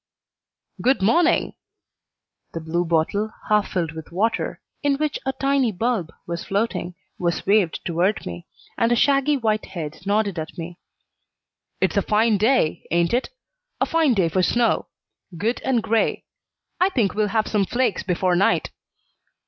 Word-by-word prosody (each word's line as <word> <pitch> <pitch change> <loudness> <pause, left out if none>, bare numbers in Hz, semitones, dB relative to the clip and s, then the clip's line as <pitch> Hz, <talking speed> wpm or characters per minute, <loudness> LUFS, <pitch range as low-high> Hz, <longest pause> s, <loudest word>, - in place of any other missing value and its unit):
"Good 255 -5 +2
morning!" 335 - +3 1.0
The 165 - -3
blue 165 +2 -1
bottle, 170 +6 0 0.2
half 210 -1 +2
filled 170 -4 -1
with 160 0 -9
water, 215 +6 -1 0.2
in 285 -2 +2
which 300 0 -1
a 265 - +1
tiny 275 -2 +1
bulb 205 -4 -1
was 170 0 -4
floating, 195 -4 -2 0.2
was 170 -1 -1
waved 200 -5 +2
toward 175 +5 0
me, 85 -1 -7 0.3
and 230 +1 +3
a - - +5
shaggy 280 +3 +3
white 215 -3 0
head 160 -5 -6
nodded 200 -2 0
at 155 - -7
me. 170 +1 -7 1.0
"It's - - +1
a - - +5
fine 215 0 +2
day, 215 -8 +2
ain't 170 +2 +1
it? 250 +2 +1 0.5
a - - +3
fine 320 -7 +2
day 185 -4 +3
for 175 +3 +1
snow. 235 +5 +2 0.5
Good 225 +8 -1
and 245 -4 +1
gray. 225 0 0 0.5
I 370 - +4
think 235 - +1
we'll 210 0 +1
have 215 +1 +1
some 200 -3 +1
flakes 240 -5 0
before 180 0 +1
night. 190 +3 +2
210 Hz, 155 wpm, -23 LUFS, 175-240 Hz, 1.0 s, a